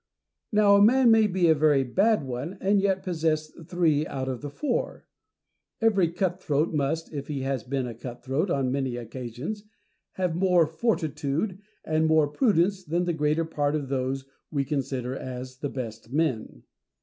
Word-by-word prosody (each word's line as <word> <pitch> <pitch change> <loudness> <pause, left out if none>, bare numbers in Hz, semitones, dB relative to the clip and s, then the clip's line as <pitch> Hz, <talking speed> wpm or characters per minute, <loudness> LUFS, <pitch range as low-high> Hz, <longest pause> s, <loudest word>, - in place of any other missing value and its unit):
Now 205 -2 +5
a - - +5
man 240 +3 +6
may 220 -1 +5
be 185 -3 +2
a 160 - +6
very 150 -3 +3
bad 195 - +2
one, 135 +8 -5
and 200 +1 +2
yet 195 -1 +1
possess 160 -3 -1 0.2
three 160 -4 +1
out 130 -1 -4
of 130 -2 -3
the 145 - -5
four. 280 - -3 0.7
Every 200 -7 +3
cut 180 +1 -1
throat 150 +2 0
must, 155 +3 -1
if 140 -2 -5
he 145 -3 -3
has 135 -3 -2
been 130 +1 -2
a 120 - -5
cut 120 +1 -9
throat 145 +8 0
on 135 -5 0
many 135 -2 -1
occasions, 125 - -6 0.5
have 180 -3 -1
more 180 -2 +4
fortitude 160 - -1 0.3
and 160 0 +1
more 160 -1 +4
prudence 190 - +2
than 170 +2 -1
the 175 -1 0
greater 155 +1 +1
part 145 -2 -1
of 145 -3 -3
those 135 0 -1
whom 135 - -33 0.2
we 140 -2 -1
consider 130 -3 -2
as 130 0 -7
the 145 - -3
best 115 -3 -7
men. 145 -6 -1
155 Hz, 175 wpm, -26 LUFS, 135-180 Hz, 0.7 s, man